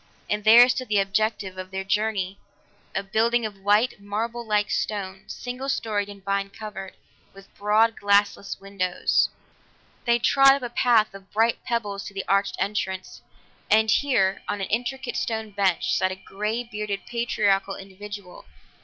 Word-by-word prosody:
And 210 0 0
there 230 +3 +9
stood 255 0 -1
the 210 - +1
objective 195 -1 0
of 185 0 -6
their 190 0 -4
journey 200 -1 -1 0.6
a 195 - 0
building 225 +4 +1
of 205 -2 -6
white, 205 +3 +2
marble 225 +4 -3
like 210 -2 0
stone, 195 -2 -3
single 250 +2 -5
storied 210 -5 -1
and 200 -1 -11
vine 195 0 0
covered, 200 -2 -8 0.4
with 195 0 -16
broad 215 +2 +3
glassless 200 0 +2
windows. 195 -2 +1 0.8
They 235 -1 +4
trod 275 +3 +6
upon 280 - -6
a 245 - -3
path 230 -5 +3
of 195 0 -13
bright 225 +2 +1
pebbles 205 -4 -2
to 200 - -9
the 195 - -3
arched 195 0 +2
entrance, 190 -2 -3 0.5
and 220 +1 +4
here, 200 -10 +2
on 205 - -2
an 195 - -3
intricate 245 +3 -2
stone 220 -2 -2
bench, 195 -3 +1
sat 185 - +1
a - - -4
grey 210 +5 -3
bearded 210 -4 -4
patriarchal 205 -5 0
individual. 200 0 -10
205 Hz, 155 wpm, -25 LUFS, 195-225 Hz, 0.8 s, there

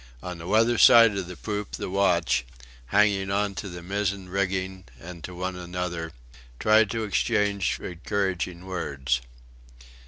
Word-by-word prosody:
On 90 -1 -6
the 85 - -8
weather 115 +4 +3
side 115 -3 +8
of 95 -2 -3
the 90 - -9
poop 105 -2 -4
the - - -4
watch, 90 -8 +2 0.4
hanging 100 0 +2
on 100 +1 0
to 95 +1 -6
the 85 -1 -8
mizen 100 0 -2
rigging 95 -1 -2
and 85 +2 -10
to 90 - -7
one 90 +1 -3
another, 90 -2 -4 0.5
tried 110 -1 +4
to 115 +1 -2
exchange 100 -2 0
encouraging 90 -1 -3
words. 70 -9 -2
95 Hz, 145 wpm, -26 LUFS, 90-100 Hz, 0.5 s, side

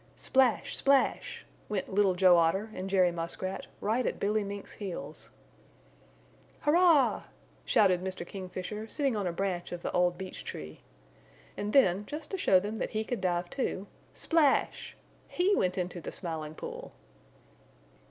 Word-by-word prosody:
Splash! 260 -3 +2
Splash! 275 -1 +1 0.2
Went 200 -2 -3
Little 195 -2 +3
Joe 180 -1 +6
Otter 175 +6 +2
and 185 +1 -5
Jerry 185 -2 +4
Muskrat, 170 +3 -5
right 225 +5 +1
at - - -2
Billy 210 +1 +1
Mink's 200 0 -6
heels. 155 -7 -7 1.3
"Hurrah!" 325 -1 +4 0.4
shouted 185 -3 +3
Mr. 185 -2 -4
Kingfisher, 190 +3 -6
sitting 275 -3 0
on 200 -3 -1
a - - 0
branch 180 0 -3
of 175 0 -6
the - - -2
old 180 0 +2
beech 190 0 -7
tree. 80 0 -8 0.7
And 205 +1 -3
then 205 -6 +4
just 300 0 -6
to 385 - -2
show 190 - +5
them 210 +4 -4
that - - -2
he 215 0 -2
could 235 -1 -4
dive, 175 -1 0
too, 225 -7 -2 0.3
splash! 315 -5 +1 0.3
He 385 +3 +2
went 185 0 0
into 180 -1 -3
the - - -6
Smiling 160 -3 -5
Pool. - - -8
195 Hz, 150 wpm, -30 LUFS, 180-220 Hz, 1.3 s, Joe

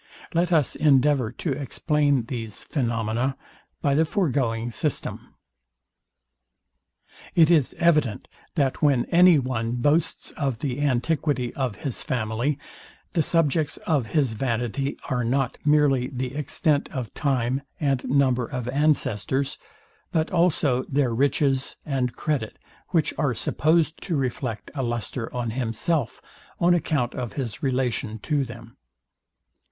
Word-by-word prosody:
Let 170 +1 +1
us 155 -6 +3
endeavour 140 -4 +3
to 160 - -3
explain 145 0 +1
these 115 -3 -6
phaenomena 120 0 -1 0.5
by 140 - +3
the 155 +3 +4
foregoing 130 - 0
system. 150 +5 -4 2.0
It 165 -1 +6
is 150 -7 +3
evident, 150 -10 +2 0.3
that 140 -5 0
when 140 -5 +3
any 175 -1 +7
one 120 -4 -1
boasts 145 +7 +1
of 135 -5 -2
the 130 +2 -3
antiquity 140 -1 0
of 130 -6 -2
his 130 +3 -4
family, 120 +3 -1 0.5
the 170 - +2
subjects 155 -1 +1
of 145 -9 +1
his 135 -3 +1
vanity 120 +3 -2
are 125 -1 0
not 130 +2 0
merely 145 -4 +3
the 130 -1 -4
extent 150 0 0
of 125 -5 -5
time 130 -2 0 0.2
and 135 -4 +1
number 130 -3 +2
of 125 -4 -4
ancestors, 135 -2 0 0.5
but 160 -1 0
also 155 -7 +2
their 135 -4 +1
riches 135 +1 +1
and 130 -4 -1
credit, 140 -8 -2 0.3
which 165 -4 +1
are 135 -5 +1
supposed 160 +4 +1
to 175 - -2
reflect 125 -4 -3
a 140 - -2
lustre 120 -1 -3
on 120 -2 -2
himself 125 +4 -1 0.4
on 175 +1 +4
account 150 -7 0
of 125 -3 -4
his 120 -6 -4
relation 125 -4 -1
to 145 +6 0
them. 120 -2 -10
135 Hz, 125 wpm, -25 LUFS, 120-150 Hz, 2.0 s, any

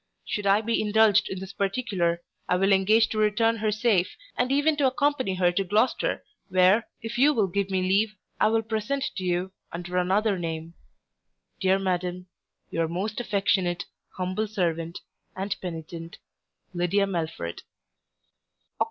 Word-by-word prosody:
Should 205 -2 -2
I 200 +2 +5
be 230 +1 0
indulged 210 -1 +4
in 190 - -4
this 190 +1 -8
particular, 195 -5 -1 0.3
I - - +4
will 195 +2 +2
engage 215 +4 +4
to 215 - -2
return 225 +2 +2
her 215 0 0
safe, 210 -4 +1 0.2
and 250 +1 0
even 290 +3 +3
to 280 -2 +4
accompany 260 -6 +1
her 180 -1 +3
to 195 +3 0
Gloucester, 210 +6 +1 0.3
where, 185 +4 +4 0.2
if 225 +1 -4
you 295 +3 +5
will 215 - +3
give 195 +1 -1
me 190 -1 0
leave, 205 +3 +2 0.2
I - - +5
will 225 +1 +2
present 225 +5 -2
to 190 - -3
you, 180 +1 -1 0.2
under 180 +1 -4
another 195 +2 +2
name, 165 -1 -4 0.9
Dear 190 0 +3
Madam, 180 -1 -2 0.5
Your 165 -1 0
most 195 +7 -3
affectionate 195 -5 0 0.3
Humble 185 +4 -1
servant, 170 -5 -2 0.3
And 195 +1 -2
penitent, 165 -1 -7 0.6
LYDIA 180 +3 +2
MELFORD 160 - -3
Oct. - - -24
195 Hz, 150 wpm, -26 LUFS, 180-220 Hz, 0.9 s, I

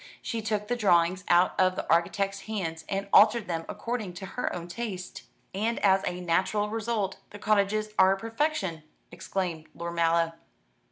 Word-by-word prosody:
She 230 -3 -4
took 210 -1 -2
the 245 - 0
drawings 185 -4 +3
out 175 +1 +5
of 185 0 +4
the - - -4
architect's 195 +4 +1
hands, 165 -7 -4
and 195 0 -2
altered 215 +1 +6
them 165 -2 -3
according 230 -6 -4
to 180 +2 -7
her 250 - -3
own 175 -1 -5
taste." 185 - -6 0.3
"And 220 +4 -1
as 190 -1 +4
a 180 0 -3
natural 190 +5 0
result, 220 -3 -2
the 205 - -10
cottages 215 0 +1
are 190 +1 +6
perfection!" 225 - -2 0.3
exclaimed 175 -2 -4
Lord 170 0 -5
Mallow. 165 0 +2
195 Hz, 160 wpm, -28 LUFS, 175-215 Hz, 0.3 s, altered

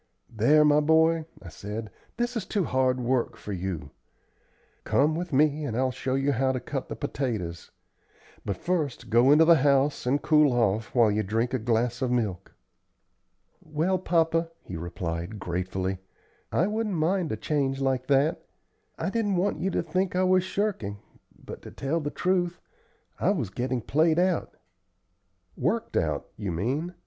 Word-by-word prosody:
"There, 150 +8 +5
my 150 0 +5
boy," 160 +1 +3 0.2
I 85 - -8
said, 105 +5 -6 0.3
"this 240 +1 -1
is 225 - -1
too 200 0 -1
hard 130 -3 +1
work 125 0 0
for 105 - -6
you. 90 -6 -4 0.9
Come 150 +3 +2
with 175 +2 -4
me 150 +2 +2
and 120 -6 -3
I'll 130 0 +1
show 130 +1 -2
you 135 +1 +1
how 130 +1 +1
to 130 - -2
cut 135 +1 -5
the - - -4
potatoes. 115 - -4 0.7
But 100 -3 -3
first 160 -11 -2
go 120 +4 +5
into 155 +2 +7
the 170 0 +7
house, 140 -1 +2
and 140 +3 +2
cool 150 -4 +4
off 115 -1 0
while 115 -3 +5
you 105 +1 +1
drink 115 +5 -1
a 130 - +1
glass 120 +2 0
of 130 - +1
milk." 110 -8 -2 1.1
"Well, 165 +4 0
papa," 165 -1 +1
he 90 - -7
replied, 85 +3 -4
gratefully, 95 0 -3 0.5
"I 170 - +2
wouldn't 210 -1 -1
mind 170 +1 0
a - - -2
change 135 -3 -1
like 130 -1 0
that. 140 +3 +2 0.5
I 190 - -2
didn't 210 -3 0
want 185 +3 0
you 190 - 0
to - - -1
think 185 +3 -1
I 185 - +2
was 185 0 +4
shirking, 185 - -2 0.4
but, - - -10
to - - -10
tell 145 +5 -2
the 145 -2 -3
truth, 175 +1 0 0.6
I - - +2
was 140 - -1
getting 125 +3 -2
played 155 +7 +2
out." 180 -1 0 1.0
"Worked - - -1
out, - - 0
you 100 -3 -3
mean. 135 - -2
135 Hz, 165 wpm, -27 LUFS, 115-165 Hz, 1.1 s, into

